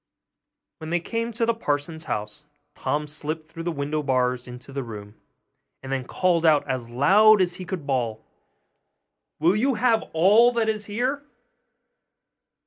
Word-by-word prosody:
When 160 - -7
they 175 +1 +1
came 230 +6 -3
to 230 +1 0
the 230 - +2
parson's 160 -5 -3
house, 105 +8 -5 0.3
Tom 150 +1 -2
slipped 155 +2 -5
through 165 - -7
the 170 +1 -2
window 150 0 -2
bars 125 -3 0
into 125 +2 -11
the 140 - -2
room, 105 -4 -9 0.7
and 135 - -7
then 135 -2 -2
called 175 +3 +1
out 155 -3 +4
as 130 -3 -3
loud 200 - +5
as 180 -2 +1
he 185 - -7
could 175 -4 -5
bawl, 120 -5 -2 1.1
'Will 170 +5 +3
you 255 +4 +1
have 225 0 +2
all 205 +9 +5
that 230 -2 +1
is 215 -1 -2
here? 250 +7 -2
160 Hz, 155 wpm, -24 LUFS, 135-210 Hz, 1.1 s, loud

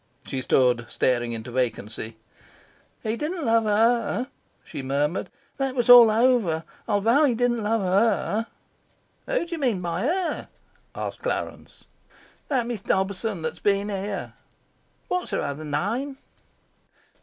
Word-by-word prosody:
She 130 - -3
stood 125 -2 +2
staring 120 -2 +1
into 115 +1 -6
vacancy. 115 -2 -3 0.9
"He 220 0 -1
didn't 310 +4 -3
love 225 -1 +3
HER," 230 +4 +2 0.3
she - - -7
murmured. 145 +5 -1 0.3
"That 270 -1 -1
was 245 -1 +4
all 240 -2 +10
over. 220 -8 +2 0.2
I'll 205 -2 +1
vow 235 +8 +4
he 250 -5 +2
didn't 240 0 +1
love 220 +1 +1
HER." 210 +3 +1 0.8
"Who - - 0
d'you 335 -1 -5
mean 245 -9 +1
by 170 -2 -2
her?" 350 +7 -1 0.5
asked - - -5
Clarence. - - -4 0.6
"That 260 -5 +1
Miss 235 -4 -4
Dobson 190 -1 -1
that's 160 - -4
been 200 0 +1
here." 200 0 -4 0.7
"What's 360 0 -1
her - - -1
other 145 +2 -4
name?" 225 - -2
215 Hz, 130 wpm, -25 LUFS, 160-245 Hz, 0.9 s, all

